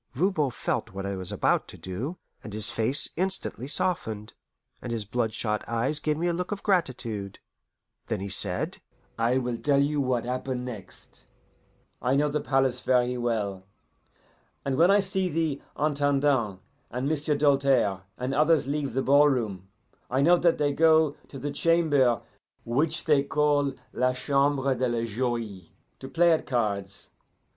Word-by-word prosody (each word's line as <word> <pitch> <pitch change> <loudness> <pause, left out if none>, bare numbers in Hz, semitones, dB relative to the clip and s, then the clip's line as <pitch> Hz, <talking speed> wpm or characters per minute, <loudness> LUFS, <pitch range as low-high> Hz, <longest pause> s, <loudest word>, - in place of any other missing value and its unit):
Voban 155 -2 +1
felt 115 -2 -3
what 95 0 -5
I 100 0 -2
was 95 -1 -4
about - - +1
to - - -11
do, 120 - -5 0.3
and 105 - -8
his 110 0 0
face 120 +5 +1
instantly 185 -8 -2
softened, 110 - -2 0.5
and 120 - -5
his 115 -3 -2
blood 115 +1 -1
shot 105 -1 -2
eyes 120 +6 0
gave 150 0 -1
me 170 - -1
a 175 - +1
look 180 +3 -3
of 205 -1 -4
gratitude. 120 - -1 0.7
Then - - -2
he 100 - -4
said: 95 -2 0 0.4
"I 120 +3 +2
will 125 -2 -2
tell 140 +3 +2
you 145 +1 +1
what 125 -3 0
happen 125 0 -3
next 105 -7 -10 0.7
I 130 +2 +1
know 150 +1 +2
the 150 0 -1
palace 135 -1 +1
very 125 -1 +2
well, 105 -6 -2 1.0
and 135 -1 0
when 170 +6 +5
I 200 +1 +5
see 190 -1 -1
the 160 -3 -1 0.2
Intendant 140 -8 +1 0.3
and 125 +3 -3
M'sieu' 150 0 0
Doltaire 135 -9 +3 0.2
and 125 +2 -3
others 155 +3 +3
leave 140 0 -2
the 135 - +1
ballroom 125 -10 +3 0.4
I 130 +2 +1
knew 175 +4 +5
that 170 -1 +3
they 145 -1 +1
go 160 -1 +4 0.2
to 135 - -9
the 145 +2 -4
chamber 145 -6 +2 0.4
which 150 +7 0
they 150 -3 +4
call 145 0 +1 0.2
'la 125 0 +1
Chambre 140 +1 +1
de 130 0 0
la 115 -1 -1
Joie,' 115 -6 -3 0.3
to 130 - -8
play 170 +4 +4
at 160 - +1
cards. 100 -6 -2
135 Hz, 160 wpm, -27 LUFS, 115-150 Hz, 1.0 s, when